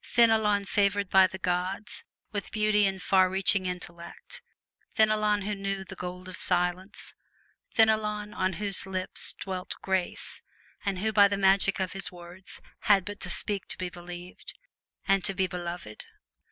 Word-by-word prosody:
Fenelon, 220 -3 +3
favored 200 0 +1
by 190 -1 +7
the 190 - -8
gods 185 +3 -3 0.3
with 205 -3 -4
beauty 210 -2 +3
and 190 -1 -4
far 185 -1 +4
reaching 190 0 +2
intellect! 175 -1 -8 0.5
Fenelon, 215 -1 +3
who 210 +1 -2
knew 195 -1 -3
the 190 0 -10
gold 180 0 -7
of 185 - -8
silence. 180 +2 0 0.6
Fenelon, 210 -1 +2
on 185 -1 0
whose 200 +1 -3
lips 185 -1 0
dwelt 185 -2 -5
grace, 190 -2 -2 0.4
and 200 -2 -1
who 220 +4 -1
by 205 -1 +7
the 200 0 -1
magic 195 0 +3
of 185 -1 -1
his 195 0 -4
words 175 +1 -12 0.2
had 195 -3 +4
but 205 +1 -7
to 180 - -6
speak 200 +3 -2
to - - -5
be 185 -1 -3
believed 175 +1 -10 0.5
and 195 -2 +3
to 195 - -1
be 190 0 +2
beloved. 175 - -6
190 Hz, 155 wpm, -28 LUFS, 180-205 Hz, 0.6 s, by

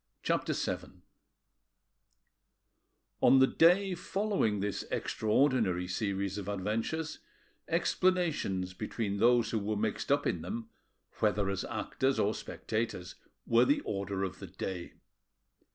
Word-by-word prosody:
CHAPTER - - 0
VII - - -4 2.2
On 135 - +7
the 130 - +7
day 180 +7 +4
following 190 - 0
this 100 0 -2
extraordinary 110 -6 +1
series 100 0 -2
of 100 - -7
adventures, 110 +11 -2 0.5
explanations 155 - +1
between 105 0 -3
those 120 +1 +4
who 110 - +1
were 105 +1 -2
mixed 110 +4 -1
up 145 0 +3
in 85 - 0
them, 115 +7 -5 0.5
whether 105 -2 +1
as 100 - -2
actors 135 0 -1
or 105 +2 +2
spectators, 110 -7 -4 0.3
were 115 0 +5
the 290 +1 +2
order 100 - -3
of 95 -1 -4
the 95 - -7
day. 90 0 -5
110 Hz, 120 wpm, -31 LUFS, 95-135 Hz, 2.2 s, On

